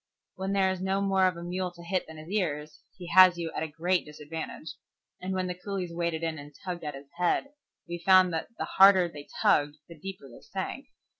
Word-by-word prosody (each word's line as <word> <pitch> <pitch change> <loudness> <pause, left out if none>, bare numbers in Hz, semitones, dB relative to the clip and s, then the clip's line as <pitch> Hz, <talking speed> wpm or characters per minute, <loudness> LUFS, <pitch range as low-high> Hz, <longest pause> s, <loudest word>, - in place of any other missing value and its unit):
When 190 +1 -3
there 190 -1 +3
is 185 -1 -4
no 190 +1 0
more 195 -1 +3
of 180 -2 -2
a 170 - -7
mule 180 +1 -2
to 170 0 -13
hit 185 +2 -1
than 160 0 -10
his 155 +3 -10
ears, 150 -7 -2 0.2
he 180 - -9
has 185 0 +8
you 165 -1 -3
at - - -2
a 160 - -1
great 170 +4 0
disadvantage, 150 0 -7 0.5
and 185 +1 -4
when 185 -1 -1
the 180 - -2
coolies 180 -1 -5
waded 170 -1 -2
in 160 -2 -2
and 145 0 -12
tugged 175 -2 -4
at 150 -2 -4
his 140 +1 -12
head, 180 +10 +1 0.4
we 170 0 -5
found 185 0 +5
that 160 - -2
the - - -2
harder 190 -2 +6
they 145 -4 -10 0.2
tugged, 145 0 +3
the 170 - -11
deeper 190 -4 -8
they 120 - -14
sank. - - -5
175 Hz, 225 wpm, -28 LUFS, 160-185 Hz, 0.5 s, has